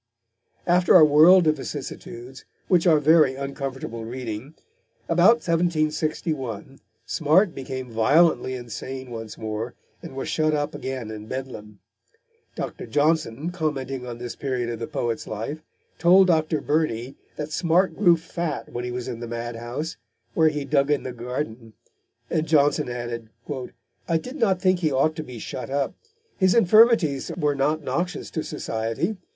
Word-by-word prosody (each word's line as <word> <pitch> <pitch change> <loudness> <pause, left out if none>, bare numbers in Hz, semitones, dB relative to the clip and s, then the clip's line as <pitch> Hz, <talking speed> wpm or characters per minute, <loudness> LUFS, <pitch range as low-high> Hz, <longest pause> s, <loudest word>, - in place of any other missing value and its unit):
After 180 +1 +4
a 165 -4 +9
world 160 +5 +7
of 155 -1 +3
vicissitudes, 130 -2 -7 0.2
which 180 -1 +3
are 160 -2 +6
very 150 -2 +5
uncomfortable 135 -4 -5
reading, 120 +3 -6 0.5
about 180 +8 +4
1761 155 - -1 0.3
Smart 165 +5 +3
became 130 -2 -6
violently 130 +4 +3
insane 130 +2 -7
once 115 -2 -7
more 110 +2 -4 0.3
and - - -9
was 135 - -4
shut 155 -1 +1
up 145 0 -2
again 130 -4 -5
in 105 0 -8
Bedlam. 110 -6 -7 0.7
Dr. - - -5
Johnson, 150 -1 +1
commenting 135 -7 -3
on 120 -1 -6
this 120 0 -6
period 125 -4 -2
of 115 - -5
the 115 - -4
poet's 115 -2 -3
life, 115 +9 -5 0.4
told 185 +3 +6
Dr. 155 -3 +1
Burney 135 -5 -1 0.2
that 150 0 -5
Smart 170 +1 +2
grew 175 -3 +5
fat 165 -2 -4
when 120 - -3
he 125 - -4
was 125 0 -4
in 120 -3 -5
the 120 - -6
madhouse, 120 +6 -5 0.4
where 160 -1 +4
he 150 -2 -4
dug 140 0 +2
in 145 -1 +1
the 130 - -5
garden, 120 -2 -5 0.5
and 160 0 -1
Johnson 145 -4 +3
added: 120 -2 -5 0.8
"I 165 - +2
did 250 - -7
not 195 -8 +2
think 185 -1 +2
he 160 -4 +1
ought 140 +4 +2
to 155 - -3
be 125 -5 -9
shut 125 +4 -6
up. 140 0 -1 0.5
His 185 +1 +4
infirmities 215 - +4
were 150 -4 +1
not 150 +3 0
noxious 170 +8 -3
to 160 - -2
society. 115 - -3
140 Hz, 150 wpm, -24 LUFS, 120-160 Hz, 0.8 s, a